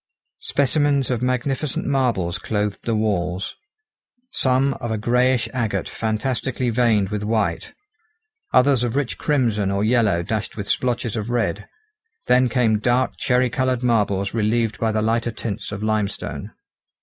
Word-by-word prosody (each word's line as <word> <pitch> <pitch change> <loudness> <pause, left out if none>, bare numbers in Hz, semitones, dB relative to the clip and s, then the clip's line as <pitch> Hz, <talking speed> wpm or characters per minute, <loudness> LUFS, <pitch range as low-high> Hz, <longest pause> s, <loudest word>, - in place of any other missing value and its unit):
Specimens 140 -1 +1
of 120 -2 -1
magnificent 130 +3 -1
marbles 120 -11 0
clothed 105 -2 -2
the 115 - 0
walls, 95 -4 -1 0.8
some 135 - +2
of 120 - -3
a 110 - -1
greyish 125 +2 +2
agate 110 -6 -1
fantastically 120 +2 -1
veined 110 -5 +2
with 105 -1 -3
white, 105 0 -1 0.8
others 130 -1 +4
of 120 0 -1
rich 140 -3 -1
crimson 115 -9 +1
or 100 +1 0
yellow 110 -6 +2
dashed 110 +4 -3
with 100 -1 -4
splotches 120 -3 0
of 110 0 -3
red; 110 -4 -1 0.6
then 125 0 +4
came 115 -3 +2
dark 125 +3 +1
cherry 125 -1 +2
coloured 130 -3 0
marbles 100 -5 +1
relieved 110 -2 0
by 110 -1 +1
the 110 0 0
lighter 115 +2 +1
tints 110 -3 -5
of 105 0 -5
limestone. 110 -2 -2
115 Hz, 140 wpm, -22 LUFS, 105-125 Hz, 0.8 s, others